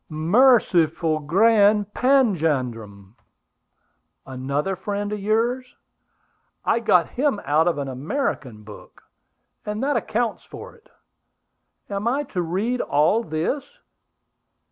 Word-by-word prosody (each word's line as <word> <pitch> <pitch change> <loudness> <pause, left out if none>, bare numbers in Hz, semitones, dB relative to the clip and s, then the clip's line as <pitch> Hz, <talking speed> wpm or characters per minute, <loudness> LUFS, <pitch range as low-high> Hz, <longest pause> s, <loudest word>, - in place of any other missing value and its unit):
"Merciful 165 - +2
Grand 205 +5 +3
Panjandrum!" 135 - 0 1.1
"Another 140 +8 -3
friend 205 +2 -4
of 210 - -4
yours!" 235 +5 -1 0.9
"I - - +2
got 180 -7 +2
him 270 -4 -1
out 155 +3 +2
of 170 - 0
an 140 -1 -3
American 135 - -4
book; 105 0 -14 0.6
and 210 +3 -4
that 285 +1 +1
accounts 235 0 -2
for - - -11
it! 455 - -24 1.0
Am 200 +2 -3
I 275 +5 0
to 180 - 0
read 200 +9 -2
all 155 +10 +2
this? 170 - -2
195 Hz, 105 wpm, -22 LUFS, 150-230 Hz, 1.1 s, Grand